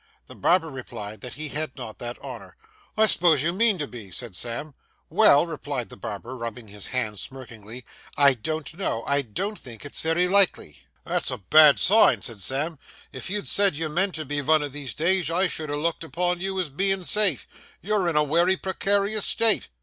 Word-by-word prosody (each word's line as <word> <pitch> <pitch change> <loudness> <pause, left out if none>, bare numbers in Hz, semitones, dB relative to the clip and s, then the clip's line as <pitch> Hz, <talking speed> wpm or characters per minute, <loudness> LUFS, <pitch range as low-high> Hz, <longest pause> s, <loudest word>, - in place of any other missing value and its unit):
The - - -13
barber 165 -2 +1
replied 110 -5 -8
that 125 - -8
he 155 0 -5
had 150 0 -5
not 115 -4 -9
that 120 0 -6
honour. 115 -9 -10 0.4
'I 220 - +5
s'pose 170 -8 +4
you 170 +2 0
mean 215 0 +2
to 150 - -3
be?' 115 -7 -11
said 110 +2 -5
Sam. 120 +8 -4 0.4
'Well,' - - +5
replied - - -6
the - - -10
barber, 125 +3 -7
rubbing 115 -2 -8
his 100 -1 -6
hands 110 -6 -3
smirkingly, 120 -2 -11 0.3
'I 140 -1 +5
don't 155 +7 -5
know, 115 -12 -2
I 140 0 +1
don't 195 - -5
think 120 +1 -11
it's 145 - -4
very 165 +3 +1
likely.' 190 - +2 0.3
'That's - - -1
a - - -3
bad 150 +8 +6
sign,' 215 +4 +5
said 115 -5 -3
Sam; 145 - -2 0.3
'if - - -6
you'd 205 +1 -3
said 200 -5 +3
you 160 +1 -3
meant 180 +5 -1
to 155 -1 -5
be 145 +2 -3
vun 155 +2 +2
o' 145 - -3
these 140 -1 -6
days, 175 0 +2
I 180 +3 +1
should 160 -4 -2
ha' - - -3
looked 165 +2 -2
upon 175 +2 -2
you 190 0 -3
as 170 -6 -3
bein' 195 +5 +2
safe. 200 -5 +3 0.3
You're 200 -2 -1
in 165 - -3
a 150 - +3
wery 170 +5 +2
precarious 200 +2 0
state. 225 -1 +4
155 Hz, 200 wpm, -24 LUFS, 125-185 Hz, 0.4 s, bad